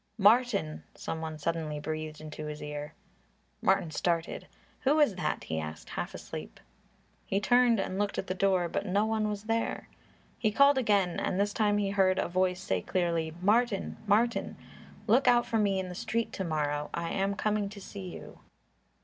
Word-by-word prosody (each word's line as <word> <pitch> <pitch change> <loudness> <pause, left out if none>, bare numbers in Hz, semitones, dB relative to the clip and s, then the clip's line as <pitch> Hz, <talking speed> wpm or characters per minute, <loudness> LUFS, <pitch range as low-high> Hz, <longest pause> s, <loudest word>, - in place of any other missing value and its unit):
"Martin!" 210 -6 +3
Some 160 - -4
one 160 -1 -4
suddenly 155 -1 -2
breathed 155 0 -4
into 155 0 -7
his 150 0 -6
ear. 150 0 -6 0.7
Martin 160 - +2
started. 170 +1 -1 0.3
"Who 290 +4 +3
is 290 -8 +5
that?" 180 - -2
he 80 0 -3
asked, 75 0 -7
half - - -4
asleep. - - -8 0.7
He 195 - +1
turned 245 +2 +4
and 190 0 -2
looked 205 -1 -1
at - - -2
the 185 - -2
door, 185 -2 +2
but - - -2
no 200 +3 +2
one 220 -1 0
was 205 -1 -4
there. 225 +1 -2 0.5
He 215 - +2
called 280 +4 +5
again 200 -7 +2
and 185 - -1
this 205 0 +1
time 210 -2 +2
he 200 -1 0
heard 190 -2 +3
a - - +1
voice 185 +1 +1
say 95 -1 -1
clearly, 170 - -1
"Martin! 215 +1 +2
Martin! 230 +4 +2 0.5
Look 245 +5 +4
out 240 0 +5
for 230 -2 0
me 200 -2 +2
in 185 - -3
the 180 - -6
street 230 +5 -2
to 190 - -3
morrow; 150 -3 -1
I 170 0 -3
am 195 +1 0
coming 210 -1 0
to 205 0 -10
see 195 -1 -8
you." - - -10
195 Hz, 185 wpm, -30 LUFS, 165-215 Hz, 0.7 s, is